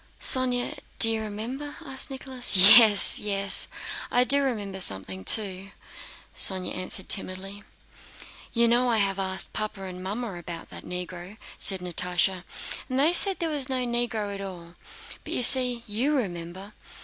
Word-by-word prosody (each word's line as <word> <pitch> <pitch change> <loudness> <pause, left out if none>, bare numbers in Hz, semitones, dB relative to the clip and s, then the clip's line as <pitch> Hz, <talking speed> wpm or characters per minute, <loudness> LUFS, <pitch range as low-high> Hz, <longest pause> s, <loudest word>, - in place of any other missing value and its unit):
"Sónya, 250 -1 0 0.2
do 225 - +4
you 220 -1 -5
remember?" 235 +8 -10
asked 270 +1 -8
Nicholas. 260 -5 -3 0.2
"Yes, 215 -4 +9
yes, 200 -1 +5 0.4
I 245 - -1
do 280 +2 +2
remember 205 -8 -7
something 95 - -6
too," 195 - -1 0.7
Sónya 185 -2 +1
answered 185 +1 -7
timidly. 195 +1 -5 0.9
"You 235 0 -1
know 245 +2 -2
I 230 - -2
have 195 -2 -4
asked 190 0 -7
Papa 215 -2 -8
and 185 -1 -12
Mamma 210 +3 -8
about 170 -1 -12
that - - -11
Negro," 180 +2 -11 0.2
said 190 -2 -3
Natásha, 180 +1 -4 0.5
"and 255 - -6
they 300 +5 0
say 390 +2 +3
there 335 -3 -7
was 285 -3 -5
no 255 -1 -5
Negro 235 -4 -6
at 200 - -11
all. 175 -3 -13 0.5
But - - -9
you - - -2
see, 250 -1 +5
you 240 +8 -5
remember!" 190 -3 -9
210 Hz, 150 wpm, -22 LUFS, 185-245 Hz, 0.9 s, Yes